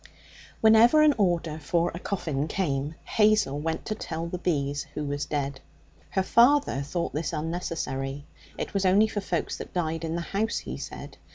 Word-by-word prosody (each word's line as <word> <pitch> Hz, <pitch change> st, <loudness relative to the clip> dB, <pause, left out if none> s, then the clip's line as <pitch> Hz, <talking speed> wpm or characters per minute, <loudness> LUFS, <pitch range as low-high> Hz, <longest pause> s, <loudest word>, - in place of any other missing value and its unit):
Whenever 225 Hz, +7 st, +7 dB
an 300 Hz, -1 st, +6 dB
order 170 Hz, -5 st, +1 dB
for 170 Hz, +3 st, 0 dB
a 170 Hz, -, -6 dB
coffin 155 Hz, -8 st, -2 dB
came, 150 Hz, -4 st, -1 dB
Hazel 210 Hz, -10 st, +2 dB
went 160 Hz, +1 st, -3 dB
to -, -, -2 dB
tell 165 Hz, -5 st, -5 dB
the 175 Hz, +1 st, -4 dB
bees 145 Hz, -5 st, -1 dB
who 150 Hz, -, -2 dB
was 145 Hz, 0 st, -3 dB
dead. 140 Hz, -2 st, -2 dB, 0.5 s
Her 190 Hz, -, 0 dB
father 245 Hz, -, +4 dB
thought 170 Hz, +5 st, -3 dB
this 155 Hz, +3 st, -2 dB
unnecessary. 150 Hz, -4 st, -3 dB, 0.3 s
It -, -, -4 dB
was 200 Hz, -1 st, 0 dB
only 195 Hz, +3 st, +5 dB
for 215 Hz, -1 st, -3 dB
folks 175 Hz, -4 st, -2 dB
that -, -, -9 dB
died 165 Hz, -2 st, -1 dB
in 165 Hz, 0 st, -2 dB
the 170 Hz, -, -2 dB
house, 215 Hz, +3 st, 0 dB
he -, -, -5 dB
said. -, -, -8 dB
165 Hz, 175 wpm, -27 LUFS, 145-195 Hz, 0.5 s, Whenever